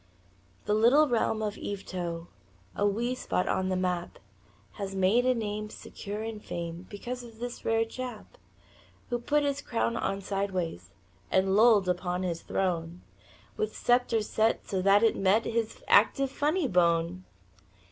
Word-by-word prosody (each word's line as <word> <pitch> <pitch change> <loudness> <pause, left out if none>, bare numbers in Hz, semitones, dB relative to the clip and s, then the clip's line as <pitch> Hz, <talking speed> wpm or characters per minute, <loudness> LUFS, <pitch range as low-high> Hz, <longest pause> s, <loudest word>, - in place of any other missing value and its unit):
The 210 - +1
little 245 +8 +5
realm 220 -3 0
of 210 -1 -3
Yvetot 175 -4 -4 0.5
A 205 - +2
wee 235 +5 0
spot 215 -7 -1
on 185 0 0
the 185 - 0
map 180 -1 -2 0.5
Has 195 - -6
made 200 +7 +3
a 255 - +4
name 215 -1 -3
secure 210 0 -7
in 225 -1 -5
fame 170 -2 -6
Because 245 +5 -6
of 230 -2 -12
this 240 +1 -6
rare 225 0 +2
chap 250 - -8 0.7
Who 240 - 0
put 295 +5 +1
his 285 0 -1
crown 230 0 -1
on 195 -3 -1
sidewise 185 - -3 0.4
And 190 +1 +2
lolled 215 -3 +5
upon 180 0 -1
his 170 -2 -2
throne 175 -2 -2 0.5
With 435 0 -2
scepter 240 -2 +2
set 220 +1 0
so 190 -2 -1
that 200 +3 +5
it 225 - +4
met 200 +4 +2
His 225 -1 -2
active 275 -1 +4
funny 300 +3 +1
bone. 170 -2 +2
210 Hz, 150 wpm, -29 LUFS, 185-235 Hz, 0.7 s, little